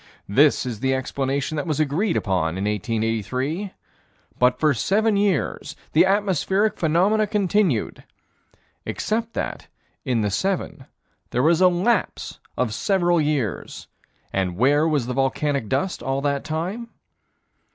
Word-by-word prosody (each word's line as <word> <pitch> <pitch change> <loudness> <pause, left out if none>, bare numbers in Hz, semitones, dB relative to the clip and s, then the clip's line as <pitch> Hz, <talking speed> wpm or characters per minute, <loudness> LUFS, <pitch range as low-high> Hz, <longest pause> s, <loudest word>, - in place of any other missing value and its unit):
This 140 +9 +3
is 120 -4 -4
the 130 +1 +1
explanation 135 +3 -2
that 150 - -3
was 155 -2 -1
agreed 155 +8 +1
upon 90 -4 -1
in 95 - -2
1883 115 - -2 0.7
But 125 0 +3
for 155 -2 +3
seven 210 - +1
years 200 -2 0 0.2
the 170 +4 +5
atmospheric 200 +1 +1
phenomena 190 +7 +2
continued 200 - 0 0.8
Except 230 +1 -2
that, - - -4 0.4
in 125 -5 0
the 105 -1 0
seven, 175 - -2 0.4
there 125 - 0
was 165 +3 +3
a 185 - +7
lapse 185 +5 0 0.2
of 120 -4 0
several 175 - +2
years 145 - -2 0.5
and 90 -2 -1
where 145 +7 +3
was 150 -6 +1
the 125 - -3
volcanic 135 -2 0
dust 160 +8 -1
all 135 +1 -1
that 140 -1 -1
time? 185 +10 -4
150 Hz, 130 wpm, -23 LUFS, 125-190 Hz, 0.8 s, a